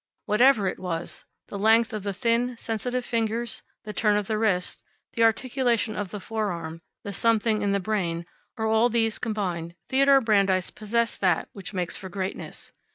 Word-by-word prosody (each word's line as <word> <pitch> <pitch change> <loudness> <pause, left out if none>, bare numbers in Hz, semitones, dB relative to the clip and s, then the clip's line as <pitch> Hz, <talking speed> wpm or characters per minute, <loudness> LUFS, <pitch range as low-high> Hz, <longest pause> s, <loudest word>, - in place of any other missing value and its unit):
Whatever 215 -1 +4
it 185 - -3
was 175 -2 -5 0.2
the 200 - -5
length 225 +2 +4
of 215 - -3
the 200 +1 -2
thin, 235 +4 0
sensitive 245 +3 -3
fingers, 230 0 -1 0.2
the 210 - -6
turn 210 -1 +2
of 210 - -1
the 215 +1 -1
wrist, 195 -5 0 0.3
the 230 - -2
articulation 235 -1 +2
of 205 -2 -3
the 210 - -6
forearm, 180 -7 -4 0.2
the 200 - -5
something 220 +1 +2
in 205 -1 +1
the 200 - +2
brain, 180 -4 -1 0.3
or 220 - -1
all 220 +2 +4
these 225 -2 +1
combined 180 -6 -3
Theodore 275 +1 +5
Brandeis 200 -6 +2
possessed 230 +2 -1
that 180 -4 +2
which 195 0 -8
makes 180 -2 -1
for 190 - -8
greatness. 190 +1 -5
215 Hz, 170 wpm, -26 LUFS, 195-230 Hz, 0.3 s, Theodore